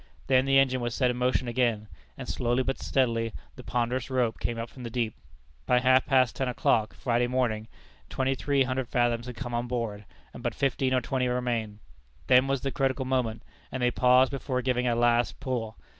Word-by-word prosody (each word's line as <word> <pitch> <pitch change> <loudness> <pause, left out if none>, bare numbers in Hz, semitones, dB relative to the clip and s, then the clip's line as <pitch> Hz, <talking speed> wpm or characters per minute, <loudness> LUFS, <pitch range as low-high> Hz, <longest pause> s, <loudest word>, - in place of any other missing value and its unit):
Then 130 0 +3
the 135 0 +4
engine 130 -2 +3
was 120 0 -2
set 125 -2 +2
in 125 - -5
motion 125 0 +1
again, 120 -3 0 0.3
and - - -7
slowly 120 +1 0
but 135 +1 -3
steadily 115 -4 0 0.2
the - - -11
ponderous 120 +4 -1
rope 125 -4 0
came 120 - -2
up 115 +1 -4
from 130 - -13
the 120 - -5
deep. 115 -2 -2 0.5
By 125 - +4
half 130 +1 +4
past 130 -4 +3
ten 130 - -1
o'clock, 115 -3 +1
Friday 120 -1 0
morning, 120 -4 -1 0.4
twenty 135 0 0
three 140 +1 +1
hundred 130 -1 -2
fathoms 120 -1 0
had 125 - -7
come 120 0 -6
on 120 +1 -1
board, 115 -4 -3 0.3
and - - -9
but - - -2
fifteen 130 -1 +1
or 130 - +2
twenty 125 +1 -1
remained. 120 -4 -2 0.4
Then 130 +1 +5
was 135 -1 0
the 135 - -2
critical 135 0 -1
moment, 125 -4 -1 0.3
and 130 -1 -3
they 125 - +3
paused 125 +1 +4
before 130 -2 -2
giving 125 -1 0
a 120 - +2
last 120 0 +2
pull. 115 -4 -3
125 Hz, 205 wpm, -27 LUFS, 120-130 Hz, 0.5 s, Then